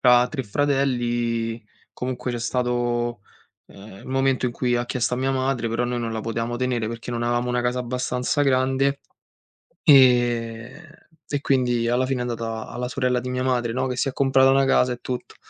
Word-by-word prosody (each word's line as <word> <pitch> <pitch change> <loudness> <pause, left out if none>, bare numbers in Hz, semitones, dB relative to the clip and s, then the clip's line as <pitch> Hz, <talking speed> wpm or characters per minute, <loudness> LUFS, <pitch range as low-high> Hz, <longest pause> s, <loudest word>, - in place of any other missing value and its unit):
tra 125 -1 +5
3 140 -4 -4
fratelli 120 -3 0 0.3
comunque 125 0 -4
c'è 120 - -3
stato, 120 -1 -1 0.5
ehm, 100 +2 -13
momento 135 -1 +1
in 120 - -2
cui 120 0 0
ha 120 0 -2
chiesto 125 -1 -1
a - - -4
mia 135 +1 0
madre, 130 -3 -1
però 115 +2 -1
noi 120 0 -2
non 115 -1 -3
la 110 - -3
potevamo 115 +2 -3
tenere 125 -3 -1
perché 115 +1 -6
non 120 0 -2
avevamo 120 +1 0
una 125 0 0
casa 125 +1 0
abbastanza 125 +3 -1
grande, 135 +1 +1 0.8
ehm, 120 +1 +3 0.4
e 145 -1 -1
quindi 125 -4 +1
alla 125 +2 +2
fine 130 -1 -1
è - - -2
andata 115 -2 -4
alla 125 +1 -4
sorella 125 -3 0
di 125 - -5
mia 125 0 -2
madre, 120 -3 0
no, 130 +1 -1
che 125 - -3
si 135 - +1
è - - -7
comprata 135 -1 +4
una 135 0 +4
casa 125 -1 +3
e 120 - -9
tutto 125 -1 -5
125 Hz, 190 wpm, -23 LUFS, 120-130 Hz, 0.8 s, tra